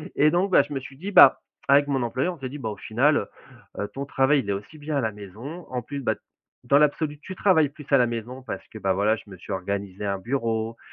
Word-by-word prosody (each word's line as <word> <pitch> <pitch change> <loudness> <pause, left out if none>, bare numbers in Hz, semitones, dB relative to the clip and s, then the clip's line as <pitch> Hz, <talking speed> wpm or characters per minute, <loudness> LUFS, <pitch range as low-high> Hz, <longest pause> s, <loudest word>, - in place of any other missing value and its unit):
Et 155 +1 +4
donc, 185 +3 +1
bah, - - +7
je - - -8
me 135 - -1
suis 135 +1 -12
dit, 190 +7 -5
bah, 140 -8 +8 0.3
avec 140 +1 +5
mon 135 -2 0
employeur, 130 +9 -1
on - - -19
s'est 135 - -4
dit: 145 - -7
«Bah, 115 -5 -3
au 105 - -6
final, 135 +9 +2 0.6
heu - - -2
heu, 105 - -3
ton 140 +1 -4
travail, 140 +1 +3
il 100 - -4
est - - +2
aussi 105 +10 -7
bien 150 0 -4
à - - +1
la 110 -2 -1
maison. 110 - -9
En 125 -1 -3
plus, 140 +4 -6
bah, 110 -4 0 0.5
dans 140 - +4
l'absolu, 150 0 +1
tu 185 +5 -8
travailles 170 -7 +4
plus 150 +1 -13
à 140 - +7
la 125 -2 +4
maison», 120 +3 -5
parce - - -5
que, - - -10
bah, 95 -2 +1
voilà, 105 +3 +2
je 105 - -14
me 95 - -9
suis 90 - -10
organisé 100 +1 -4
un 100 -1 -1
bureau. 115 -1 -2
130 Hz, 270 wpm, -25 LUFS, 110-145 Hz, 0.6 s, bah